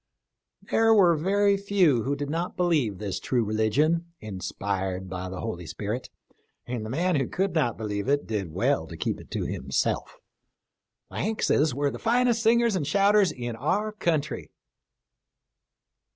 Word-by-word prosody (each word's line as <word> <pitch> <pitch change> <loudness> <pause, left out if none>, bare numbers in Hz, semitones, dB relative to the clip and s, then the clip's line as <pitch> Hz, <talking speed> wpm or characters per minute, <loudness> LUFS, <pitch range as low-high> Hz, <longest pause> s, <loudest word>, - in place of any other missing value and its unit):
There 225 0 +3
were 180 -5 +6
very 200 +5 +2
few 190 - +3
who 140 +5 -1
did 145 0 -4
not 170 +3 -3
believe 150 - +1
this 100 -2 -4
true 120 -3 0
religion, 140 +11 +1
inspired 95 -1 -3
by 95 0 -4
the 90 0 -6
Holy 90 -7 -5
Spirit, 110 +8 -4 0.6
and 120 -3 -4
the 110 - -6
man 170 +6 +1
who 135 -3 0
could 195 +1 -1
not 145 -9 +1
believe 105 0 -3
it, 145 +1 +1
did 100 -6 -3
well - - 0
to - - -9
keep - - -2
it - - -16
to - - -3
himself. - - -2 0.9
The - - -7
Hankses 160 - +1
were 140 0 0
the - - -7
finest 240 0 +2
singers 235 -1 +3
and 155 -7 -1
shouters 200 -1 +4
in 120 -2 -5
our 200 - 0
country." 160 -8 -2
145 Hz, 155 wpm, -26 LUFS, -, 0.9 s, were